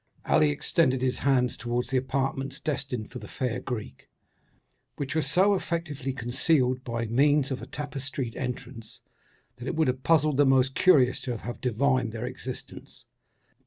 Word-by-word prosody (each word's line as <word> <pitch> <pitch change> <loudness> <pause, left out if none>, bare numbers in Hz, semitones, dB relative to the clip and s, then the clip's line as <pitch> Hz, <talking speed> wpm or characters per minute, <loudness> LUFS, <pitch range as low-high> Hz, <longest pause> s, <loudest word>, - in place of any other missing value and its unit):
Ali 75 - +4
extended 125 - +1
his 130 -1 +1
hands 130 -3 +2
towards 120 +1 -2
the 135 - +2
apartments 135 +1 -2
destined 135 -8 -3
for 125 - -7
the - - -10
fair 125 -2 -2
Greek, 110 - -6 0.9
which 140 0 -4
were 160 - +2
so 190 +6 +3
effectually 165 -7 -2
concealed 130 +1 +1
by 115 -1 -2
means 140 +4 +3
of 130 - -3
a - - -8
tapestried 135 -4 -5
entrance, 125 -3 -6 0.6
that 120 - -7
it - - -2
would 160 -2 +2
have 130 +1 -2
puzzled 155 -1 +3
the 145 - +5
most 135 0 +4
curious 130 -9 +4
to 125 -3 -3
have 120 +2 -7
divined 125 -1 +1
their 115 +1 -4
existence. 125 0 -8
130 Hz, 160 wpm, -27 LUFS, 125-140 Hz, 0.9 s, the